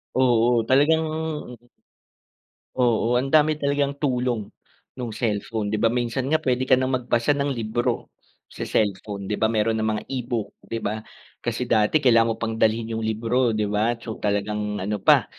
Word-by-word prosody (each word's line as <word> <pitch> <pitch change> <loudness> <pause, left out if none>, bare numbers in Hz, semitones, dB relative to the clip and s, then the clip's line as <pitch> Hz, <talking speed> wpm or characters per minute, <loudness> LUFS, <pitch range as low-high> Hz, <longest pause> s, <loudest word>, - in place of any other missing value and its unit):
Oo, 120 -2 +3
talagang. 150 +5 +4 1.7
Oo, 120 0 +2
ang 135 - -3
dami 155 0 +4
talagang 140 -1 0
tulong 125 -6 -1 0.5
ng 125 -3 -4
cellphone 110 -1 -2
'di 110 - -1
ba, 115 +2 +2
minsan 125 +1 -1
nga 155 +3 +1
pwede 130 0 0
ka 130 - +3
nang 130 0 +3
magbasa 120 +1 -1
ng 140 -1 0
libro 115 0 -2 0.4
sa - - -5
cellphone 100 -1 -1
di - - -1
ba, 110 - +2
meron 110 0 +1
ng - - 0
mga 105 0 -2
e-book, 120 -4 -3
di 115 - -5
ba, 110 +2 -3 0.4
kasi 120 +1 -2
dati 110 +6 +3
kailangan 115 -3 +4
mo - - -12
pang 115 -1 -1
dalhin 110 +1 +1
yung 110 - -3
libro 115 +3 +1
di 110 -1 0
ba, 110 +3 +1
so 110 - -6
talagang 105 0 -1
ano 105 +2 -2
pa - - +5
115 Hz, 170 wpm, -24 LUFS, 110-130 Hz, 1.7 s, pa